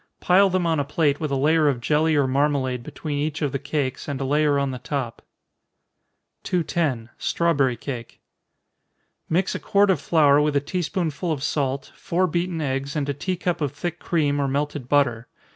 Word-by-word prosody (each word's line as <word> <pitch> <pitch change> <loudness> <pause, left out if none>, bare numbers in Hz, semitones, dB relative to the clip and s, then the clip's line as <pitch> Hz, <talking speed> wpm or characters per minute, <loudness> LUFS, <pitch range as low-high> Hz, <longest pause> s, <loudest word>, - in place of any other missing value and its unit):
Pile 190 +2 +4
them 185 -1 0
on 165 -2 +1
a - - +1
plate 145 0 +1
with 155 - -2
a 140 - 0
layer 155 +3 +3
of 130 -4 -1
jelly 155 +5 +2
or 145 -2 +3
marmalade 130 -2 0
between 145 +3 -5
each 150 +1 -2
of 145 - 0
the 140 - -2
cakes, 140 -2 -3
and 140 -3 -3
a 135 - -2
layer 145 +1 +2
on 140 -1 0
the 130 - -6
top. 130 -2 -4 1.2
210. 155 -9 -1
Strawberry 140 -8 +1
Cake. 120 -1 -7 1.1
Mix 180 +4 +1
a - - -3
quart 200 -1 +3
of 165 -7 0
flour 150 -3 +4
with 150 -1 +1
a - - +5
tea 160 +6 -3
spoonful 170 -2 -2
of 140 -4 -2
salt, 140 -3 -1
four 185 0 0
beaten 175 -1 -1
eggs, 135 -1 -2
and 145 -2 -1
a - - +1
tea 180 +6 -3
cup 175 -1 -2
of 145 -2 -1
thick 170 +3 -4
cream, 145 -4 0
or 140 - +1
melted 145 -1 -2
butter. 125 -5 +2
145 Hz, 195 wpm, -23 LUFS, 135-165 Hz, 1.2 s, a